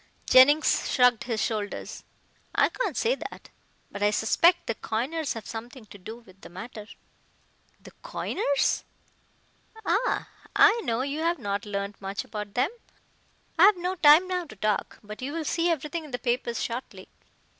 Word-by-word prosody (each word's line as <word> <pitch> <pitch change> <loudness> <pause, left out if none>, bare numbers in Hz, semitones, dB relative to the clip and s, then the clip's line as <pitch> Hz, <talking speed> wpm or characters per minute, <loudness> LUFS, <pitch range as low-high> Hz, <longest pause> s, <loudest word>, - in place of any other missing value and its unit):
Jennings 285 +4 +5
shrugged 250 -3 +3
his 230 -3 -2
shoulders. 210 -1 -3 0.5
"I - - +4
can't - - -3
say 475 +2 +2
that. - - -8 0.4
But 200 - -7
I 205 - +4
suspect 340 - +3
the 230 - -1
coiners 265 +9 -3
have 225 - -8
something 235 +2 -8
to 205 - -14
do 220 +5 -8
with 195 -5 -19
the - - -11
matter." 215 +4 -9 0.9
"The - - -14
coiners?" 395 - -1 1.0
"Ah! - - 0 0.3
I 460 +2 +6
know 230 +2 0
you 285 +2 -3
have 335 +2 +1
not 205 -4 -3
learned 200 0 -4
much 195 +1 -4
about 210 -2 -7
them. 255 +7 +1 0.9
I 360 - +9
have 415 -2 +4
no 360 +1 -2
time 330 0 +6
now 365 -1 -2
to 215 - -13
talk, 210 0 -1
but 210 +2 -9
you 275 +3 -4
will 325 -1 -3
see 335 +3 +1
everything 320 +1 -2
in - - -11
the 245 - -3
papers 240 -2 -1
shortly. 240 +2 -6
250 Hz, 165 wpm, -26 LUFS, 215-325 Hz, 1.0 s, I